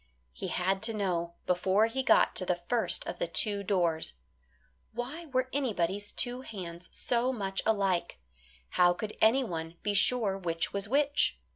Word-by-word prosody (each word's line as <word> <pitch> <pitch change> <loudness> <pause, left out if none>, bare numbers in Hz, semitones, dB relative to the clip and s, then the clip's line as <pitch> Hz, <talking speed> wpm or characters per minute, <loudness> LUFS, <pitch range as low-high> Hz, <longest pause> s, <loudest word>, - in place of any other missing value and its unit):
He - - -5
had 190 +2 0
to 225 0 0
know 170 -4 -2
before 190 +4 +2
he 230 +4 -2
got 260 - +4
to - - +2
the 180 -1 0
first 240 -2 +2
of - - -6
the - - -1
two 210 -7 +2
doors. 175 - +1 0.8
Why 270 +9 -5
were 260 -2 0
anybody's 205 -7 -1
two 245 +1 -1
hands 180 -7 -8
so 245 +1 0
much 195 -6 -2
alike? 195 -5 +1 0.5
How 175 0 +4
could 210 +4 -6
anyone 180 -9 +1
be 205 - 0
sure 200 -1 +2
which 165 -3 -2
was 200 0 -3
which? 285 +2 +2
200 Hz, 155 wpm, -30 LUFS, 180-245 Hz, 0.8 s, got